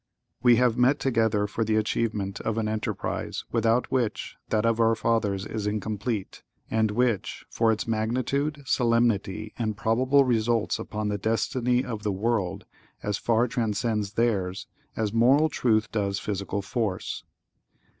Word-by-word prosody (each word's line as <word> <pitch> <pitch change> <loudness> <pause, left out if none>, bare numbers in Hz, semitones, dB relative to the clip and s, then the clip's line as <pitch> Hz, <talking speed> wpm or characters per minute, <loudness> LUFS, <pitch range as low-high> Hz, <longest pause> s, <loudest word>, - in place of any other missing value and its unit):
(¶ - - -57 0.4
2) - - -18
We 120 -1 +8
have 125 0 +2
met 130 +3 +4
together 110 -5 +1
for 105 +2 -2
the 110 0 0
achievement 110 -2 -1
of 110 0 -2
an 110 -1 0
enterprise, 110 0 -3
without 115 +1 +1
which, 120 -5 -1
that 110 0 +1
of 115 0 +2
our 115 0 +4
fathers 105 -4 0
is 105 -1 -4
incomplete, 105 0 -3 0.3
and 110 -1 +2
which, 115 -1 -1
for 115 -1 +2
its 110 - -2
magnitude, 130 +7 -1
solemnity, 115 -4 +1
and 110 -3 -1
probable 125 +5 +3
results 115 -3 +1
upon 105 -1 -3
the 105 0 -2
destiny 125 +4 0
of 115 -4 -5
the 105 -1 -1
world, 100 -2 -1 0.4
as 105 0 -1
far 115 +1 +2
transcends 110 -3 -1
theirs, 100 -5 0 0.3
as 110 -2 -1
moral 135 +7 +4
truth 110 -5 +1
does 100 -3 -1
physical 100 0 -3
force. 105 -3 -3
110 Hz, 150 wpm, -26 LUFS, 105-120 Hz, 0.4 s, We